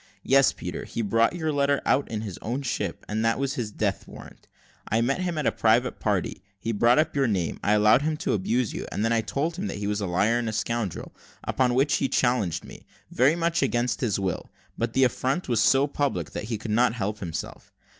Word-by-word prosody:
Yes, 135 Hz, 0 st, +5 dB
Peter; -, -, -6 dB
he 115 Hz, -, -3 dB
brought 115 Hz, -, +2 dB
your 160 Hz, -3 st, -1 dB
letter 140 Hz, 0 st, +2 dB
out 140 Hz, -, +2 dB
in 110 Hz, -2 st, -3 dB
his 100 Hz, -5 st, -6 dB
own 125 Hz, +5 st, -3 dB
ship, 130 Hz, -, -3 dB
and 110 Hz, +1 st, -1 dB
that 115 Hz, 0 st, +2 dB
was 135 Hz, 0 st, -1 dB
his 120 Hz, -6 st, -3 dB
death -, -, -2 dB
warrant. -, -, -13 dB, 0.4 s
I 110 Hz, -, +2 dB
met 135 Hz, +9 st, 0 dB
him 175 Hz, -3 st, -2 dB
at 150 Hz, -, -1 dB
a -, -, +3 dB
private 115 Hz, +3 st, +2 dB
party. 100 Hz, -2 st, -1 dB, 0.2 s
He 115 Hz, -, -2 dB
brought 120 Hz, +3 st, +4 dB
up 155 Hz, 0 st, +1 dB
your 135 Hz, -2 st, +2 dB
name 95 Hz, -7 st, -1 dB
I 105 Hz, -, +3 dB
allowed 105 Hz, +4 st, +5 dB
him 155 Hz, +1 st, -1 dB
to -, -, +2 dB
abuse 115 Hz, +4 st, 0 dB
you, -, -, -5 dB
and 105 Hz, -, -1 dB
then 115 Hz, 0 st, +2 dB
told 155 Hz, +9 st, -2 dB
him 205 Hz, +2 st, -3 dB
he 105 Hz, -, -4 dB
was 105 Hz, 0 st, -1 dB
a 100 Hz, -, -1 dB
liar 105 Hz, +7 st, +2 dB
and 115 Hz, -2 st, -2 dB
a -, -, -4 dB
scoundrel; 115 Hz, -5 st, -3 dB, 0.3 s
upon 125 Hz, -2 st, +1 dB
which 140 Hz, +3 st, +3 dB
he 135 Hz, -, 0 dB
challenged 120 Hz, -10 st, +1 dB
me, -, -, -13 dB, 0.2 s
very 135 Hz, +6 st, +3 dB
much 170 Hz, 0 st, 0 dB
against 125 Hz, -2 st, 0 dB
his 110 Hz, -7 st, +1 dB
will; 95 Hz, -3 st, -3 dB, 0.3 s
but 115 Hz, 0 st, -2 dB
the 135 Hz, -, +3 dB
affront 130 Hz, +6 st, 0 dB
was 120 Hz, -4 st, +2 dB
so 135 Hz, +5 st, +4 dB
public, 145 Hz, -1 st, -2 dB
that -, -, -5 dB
he 115 Hz, 0 st, -3 dB
couldn't 115 Hz, +2 st, +1 dB
help 105 Hz, -2 st, -3 dB
himself. 85 Hz, -4 st, -6 dB
120 Hz, 225 wpm, -26 LUFS, 105-135 Hz, 0.4 s, Yes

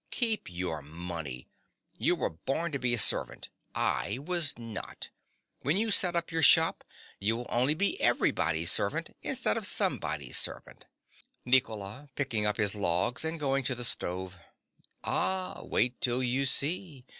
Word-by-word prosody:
Keep 225 Hz, -, 0 dB
your 85 Hz, -3 st, -4 dB
money. 80 Hz, -4 st, -7 dB, 0.5 s
You -, -, +1 dB
were -, -, -2 dB
born 135 Hz, -, -3 dB
to 140 Hz, -, -3 dB
be 120 Hz, -1 st, +2 dB
a -, -, -3 dB
servant. 105 Hz, -, +2 dB, 0.3 s
I 100 Hz, -, -1 dB
was 155 Hz, -2 st, +2 dB
not. 115 Hz, -2 st, -7 dB, 0.5 s
When 150 Hz, +6 st, 0 dB
you 220 Hz, +1 st, +1 dB
set 180 Hz, -3 st, +4 dB
up 170 Hz, +1 st, -1 dB
your 165 Hz, 0 st, +1 dB
shop 160 Hz, +2 st, +5 dB, 0.4 s
you 110 Hz, +3 st, 0 dB
will 120 Hz, -, -6 dB
only 130 Hz, +5 st, +2 dB
be 200 Hz, +5 st, +3 dB
everybody's 85 Hz, 0 st, +2 dB
servant -, -, 0 dB
instead -, -, +1 dB
of -, -, 0 dB
somebody's -, -, 0 dB
servant. -, -, -5 dB, 0.6 s
NICOLA. 125 Hz, 0 st, 0 dB
(picking 115 Hz, -7 st, 0 dB
up 105 Hz, -, 0 dB
his 105 Hz, -2 st, +1 dB
logs, 100 Hz, -, 0 dB
and 160 Hz, +1 st, 0 dB
going 135 Hz, -2 st, 0 dB
to 130 Hz, 0 st, -1 dB
the 120 Hz, 0 st, -2 dB
stove). 90 Hz, -2 st, -3 dB, 0.7 s
Ah, 185 Hz, -1 st, +2 dB
wait 125 Hz, +2 st, -1 dB
till 125 Hz, +1 st, +2 dB
you 130 Hz, +2 st, 0 dB
see. 145 Hz, -1 st, -1 dB
125 Hz, 155 wpm, -29 LUFS, 100-155 Hz, 0.7 s, shop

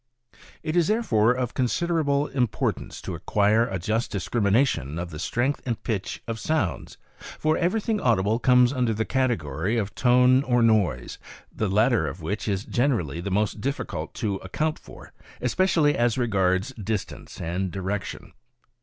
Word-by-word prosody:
It 155 Hz, -, -2 dB
is 170 Hz, -2 st, +3 dB
therefore 125 Hz, -, +3 dB
of 125 Hz, -1 st, -3 dB
considerable 145 Hz, +2 st, +1 dB
importance 125 Hz, -6 st, -2 dB
to -, -, -4 dB
acquire 110 Hz, +3 st, +2 dB
a 95 Hz, -, -3 dB
just 110 Hz, +6 st, -1 dB
discrimination 100 Hz, -, 0 dB
of 85 Hz, 0 st, -4 dB
the 75 Hz, -, -7 dB
strength 125 Hz, +10 st, -1 dB
and 120 Hz, -3 st, -3 dB
pitch 105 Hz, -5 st, -3 dB
of 115 Hz, -1 st, -4 dB
sounds, 115 Hz, -, -2 dB, 0.4 s
for 155 Hz, 0 st, +1 dB
everything 210 Hz, +5 st, 0 dB
audible 110 Hz, -1 st, +2 dB
comes 125 Hz, 0 st, +4 dB
under 125 Hz, -4 st, 0 dB
the 110 Hz, +1 st, -1 dB
category 105 Hz, -, 0 dB
of 105 Hz, -2 st, -2 dB
tone 125 Hz, +2 st, +4 dB
or 120 Hz, -3 st, +2 dB
noise, 100 Hz, -, +1 dB, 0.4 s
the 110 Hz, -, -1 dB
latter 105 Hz, -, +3 dB
of 75 Hz, +6 st, -6 dB
which 100 Hz, +8 st, -4 dB
is 100 Hz, -1 st, -1 dB
generally 110 Hz, -, 0 dB
the 100 Hz, -, -4 dB
most 105 Hz, +2 st, 0 dB
difficult 140 Hz, +4 st, -4 dB
to 105 Hz, -5 st, -1 dB
account 155 Hz, +13 st, -2 dB
for, -, -, -14 dB, 0.3 s
especially 155 Hz, +2 st, +2 dB
as 120 Hz, 0 st, +1 dB
regards 95 Hz, -5 st, +1 dB
distance 105 Hz, -1 st, -4 dB
and 90 Hz, +3 st, -2 dB
direction. 95 Hz, +3 st, -5 dB
115 Hz, 150 wpm, -25 LUFS, 95-130 Hz, 0.4 s, comes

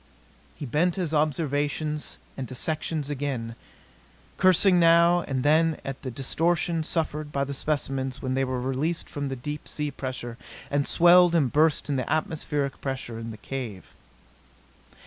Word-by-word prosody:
He -, -, -6 dB
bent 160 Hz, +7 st, +1 dB
to 190 Hz, -, -2 dB
his 165 Hz, -3 st, -2 dB
observations 150 Hz, 0 st, -1 dB, 0.2 s
and 130 Hz, -2 st, -5 dB
dissections 155 Hz, +3 st, -3 dB
again, 130 Hz, -5 st, -3 dB, 0.8 s
cursing 185 Hz, 0 st, +5 dB
now 170 Hz, +1 st, +5 dB
and 130 Hz, -2 st, -1 dB
then 160 Hz, +1 st, +3 dB
at 135 Hz, -1 st, -5 dB
the 130 Hz, -, -4 dB
distortion 165 Hz, +6 st, 0 dB
suffered 155 Hz, -2 st, -2 dB
by 140 Hz, -1 st, 0 dB
the 140 Hz, 0 st, -4 dB
specimens 135 Hz, -2 st, -2 dB
when 130 Hz, -1 st, -2 dB
they 135 Hz, +1 st, +1 dB
were 130 Hz, -1 st, -2 dB
released 135 Hz, +7 st, -1 dB
from 145 Hz, -1 st, -4 dB
the 135 Hz, -, -3 dB
deep 150 Hz, +4 st, -6 dB
sea 150 Hz, -1 st, -3 dB
pressure 125 Hz, -3 st, -5 dB, 0.3 s
and 145 Hz, 0 st, +1 dB
swelled 175 Hz, 0 st, +6 dB
and 140 Hz, -7 st, +2 dB
burst 155 Hz, +1 st, +3 dB
in 145 Hz, -2 st, 0 dB
the 130 Hz, -, -2 dB
atmospheric 150 Hz, -3 st, -1 dB
pressure 130 Hz, -4 st, -4 dB
in 115 Hz, 0 st, -6 dB
the 110 Hz, -, -8 dB
cave. 115 Hz, -6 st, -6 dB
145 Hz, 155 wpm, -26 LUFS, 130-160 Hz, 0.8 s, swelled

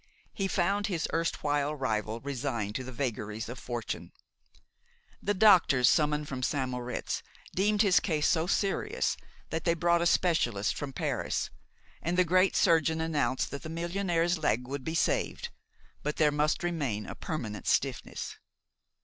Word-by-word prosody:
He 195 Hz, -, -1 dB
found 195 Hz, +3 st, +1 dB
his 170 Hz, -6 st, -1 dB
erstwhile 150 Hz, -3 st, 0 dB
rival 110 Hz, -4 st, -2 dB
resigned 120 Hz, -6 st, -3 dB
to 130 Hz, -, -3 dB
the 130 Hz, -, -7 dB
vagaries 110 Hz, -4 st, -3 dB
of 120 Hz, +3 st, -7 dB
fortune. 120 Hz, -2 st, -5 dB, 1.1 s
The 205 Hz, -, 0 dB
doctors 180 Hz, -, +6 dB
summoned 150 Hz, -1 st, +2 dB
from 130 Hz, -2 st, -4 dB
St. 130 Hz, 0 st, 0 dB
Moritz 125 Hz, 0 st, -3 dB, 0.3 s
deemed 205 Hz, +3 st, +3 dB
his 195 Hz, -3 st, +5 dB
case 155 Hz, -5 st, +1 dB
so 165 Hz, 0 st, +2 dB
serious 315 Hz, -, 0 dB, 0.4 s
that 160 Hz, -, -2 dB
they 170 Hz, -1 st, +2 dB
brought 170 Hz, +1 st, +2 dB
a 170 Hz, -, +3 dB
specialist 120 Hz, -, +2 dB
from 145 Hz, -2 st, -4 dB
Paris, -, -, -2 dB, 0.5 s
and 175 Hz, +2 st, -1 dB
the 180 Hz, -, +5 dB
great 185 Hz, +2 st, +3 dB
surgeon 160 Hz, -1 st, +3 dB
announced 145 Hz, -6 st, 0 dB
that 140 Hz, -, -5 dB
the 160 Hz, -, -7 dB
millionaire's 170 Hz, 0 st, 0 dB
leg 125 Hz, -5 st, +1 dB
would 135 Hz, 0 st, -4 dB
be 160 Hz, +3 st, -3 dB
saved; -, -, 0 dB, 0.5 s
but 150 Hz, +1 st, -2 dB
there 150 Hz, -2 st, +4 dB
must 150 Hz, +3 st, +1 dB
remain 140 Hz, -12 st, -1 dB
a -, -, -6 dB
permanent 110 Hz, -, -5 dB
stiffness. -, -, -1 dB
155 Hz, 150 wpm, -30 LUFS, 130-175 Hz, 1.1 s, doctors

